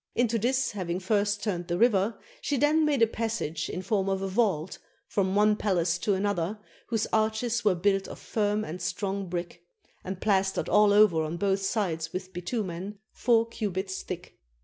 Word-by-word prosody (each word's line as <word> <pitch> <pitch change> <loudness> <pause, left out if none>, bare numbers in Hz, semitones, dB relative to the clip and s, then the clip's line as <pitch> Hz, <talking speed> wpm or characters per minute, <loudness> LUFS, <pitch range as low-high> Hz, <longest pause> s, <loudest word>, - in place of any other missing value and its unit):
Into 235 -1 +2
this 260 +3 +1
having 180 -3 -3
first 205 +1 0
turned 175 -5 -2
the 175 -1 -1
river, 215 -1 +3 0.2
she 285 - -1
then 305 +4 +3
made 285 -6 +3
a - - +5
passage 215 -9 -3
in 185 - -4
form 195 -3 0
of 195 0 -1
a - - -1
vault, 190 -5 0 0.3
from 190 -1 0
one 210 +1 +4
palace 175 -5 0
to 200 +2 +1
another, 195 0 -1 0.3
whose 225 -2 0
arches 220 +2 +1
were 205 -4 +3
built 195 +2 +1
of - - -8
firm 210 0 -1
and 170 +3 -6
strong 195 0 -2
brick, 175 0 -5 0.4
and 190 0 -5
plastered 195 -2 +1
all 210 0 +5
over 205 -6 +5
on 155 +2 -3
both 195 +1 +1
sides 170 -6 -1
with 185 0 -5
bitimien, 185 0 -4 0.2
four 230 -1 +2
cubits 190 -4 -3
thick. 180 -1 -8
200 Hz, 175 wpm, -28 LUFS, 185-220 Hz, 0.4 s, a